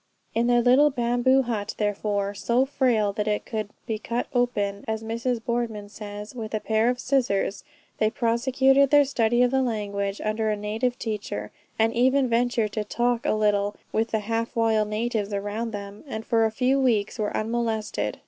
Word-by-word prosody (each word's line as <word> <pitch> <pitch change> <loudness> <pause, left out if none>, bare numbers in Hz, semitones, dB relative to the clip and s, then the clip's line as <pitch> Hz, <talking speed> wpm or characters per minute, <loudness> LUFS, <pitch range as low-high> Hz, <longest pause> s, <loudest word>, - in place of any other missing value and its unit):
In 235 +1 +1
their 240 -1 +4
little 260 +5 +6
bamboo 250 +1 +2
hut, 220 -4 -3
therefore, 205 -1 -1
so 235 +6 +1
frail 240 -7 +1
that 210 0 -2
it 210 -1 -1
could 215 -2 -3 0.2
be 220 -1 -3
cut 235 +2 -2
open, 205 -5 0
as 220 0 -2
Mrs. 235 +2 -2
Boardman 230 -4 -2
says, 210 0 -8
with 225 -3 -5
a - - 0
pair 220 +2 +1
of 250 0 -1
scissors, 240 -7 0 0.4
they 215 - +3
prosecuted 265 +4 +3
their 290 0 +6
study 240 -2 +2
of 245 - +2
the 265 0 +2
language 205 -4 -2
under 215 +1 -1
a 210 - 0
native 220 +4 -2
teacher, 205 - -4 0.3
and 225 +1 +2
even 260 +2 +3
ventured 235 -2 +1
to 215 - -2
talk 240 +2 0
a - - +3
little 205 -1 +1 0.2
with 225 +1 0
the 220 - 0
half 230 +2 -2
wild 220 -2 +2
natives 215 -1 -2
around 205 +3 -3
them, 200 -1 -8
and 225 -4 -5
for 225 -1 +3
a 220 - 0
few 255 +4 +1
weeks 230 -4 +1
were 210 -1 -1
unmolested. 220 - -2
225 Hz, 180 wpm, -25 LUFS, 210-245 Hz, 0.4 s, little